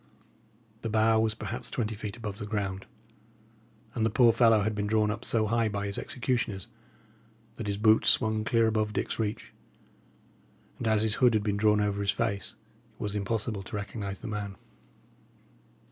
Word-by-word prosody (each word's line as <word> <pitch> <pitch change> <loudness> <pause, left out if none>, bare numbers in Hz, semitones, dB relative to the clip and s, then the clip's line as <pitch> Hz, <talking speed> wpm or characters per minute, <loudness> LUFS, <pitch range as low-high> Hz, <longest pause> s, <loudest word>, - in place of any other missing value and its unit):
The 115 - -3
bough 110 +1 +3
was 110 -1 +1
perhaps 115 +2 -5
twenty 110 -3 -2
feet 105 +1 -6
above 105 -3 -6
the 105 - -5
ground, 100 -3 -3 1.1
and 115 - -1
the 110 - +3
poor 115 +1 +5
fellow 115 -2 +5
had 110 +1 0
been 105 0 -2
drawn 105 0 +2
up 110 +1 -5
so 110 -2 +1
high 115 +1 +1
by 100 0 -3
his 100 0 -4
executioners 120 -7 -2 0.9
that 110 - -5
his 100 -1 -1
boots 110 +1 +5
swung 110 -2 +3
clear 115 0 +3
above 110 -1 0
Dick's - - -2
reach; 110 -1 -3 1.3
and 120 - -2
as 110 -1 +3
his 110 -1 +2
hood 125 -3 +5
had 105 - +1
been 100 -1 0
drawn 105 0 +3
over 100 -1 0
his 100 - -1
face, 100 -2 -1 0.4
it - - -33
was 105 0 -3
impossible 105 +1 -2
to 95 - -8
recognise 100 -1 -5
the - - -6
man. 105 -2 -4
110 Hz, 175 wpm, -29 LUFS, 105-110 Hz, 1.3 s, poor